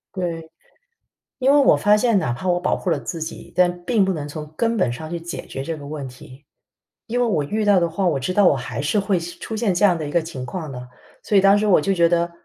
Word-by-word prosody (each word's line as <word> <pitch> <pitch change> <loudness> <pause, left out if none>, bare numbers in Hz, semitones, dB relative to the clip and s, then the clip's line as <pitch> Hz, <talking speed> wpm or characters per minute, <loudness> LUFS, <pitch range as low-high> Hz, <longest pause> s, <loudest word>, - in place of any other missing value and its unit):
对。 165 -3 -4 0.9
因 270 +1 +3
为 - - +5
我 280 - +5
发 205 0 +4
现 225 -1 +2
哪 120 -10 -1
怕 150 +10 -5
我 175 0 +2
保 180 - 0
护 - - -5
了 - - +1
自 165 - -6
己， 160 +1 -7
但 175 -1 +1
并 225 0 +2
不 190 - 0
能 150 -5 -5
从 150 +1 -8
根 230 +4 +1
本 185 - +1
上 155 +6 -7
去 170 -1 -4
解 170 +1 -7
决 135 - -6
这 160 +3 -4
个 145 -2 -10
问 145 -2 -6
题。 130 +2 -14 0.6
因 245 +1 -1
为 245 - +3
我 175 -10 0
遇 210 +9 -2
到 205 -2 +5
的 170 -1 0
话， 185 +4 -2
我 150 -6 +1
知 135 +7 -2
道 205 +1 +4
我 160 - +5
还 125 0 -5
是 155 +9 +1
会 195 -2 0
出 175 +6 -7
现 215 -3 0
这 180 - -1
样 185 -4 +5
的 155 -2 -4
一 - - -6
个 170 - +2
情 140 -6 -7
况 160 0 -6
的。 125 -1 -8 0.4
所 210 - -1
以 - - +6
当 195 +1 +5
时 210 - 0
我 195 -7 +4
就 195 +6 +1
觉 170 -1 +4
得， 170 0 +1
175 Hz, 295 characters per minute, -21 LUFS, 155-200 Hz, 0.9 s, 以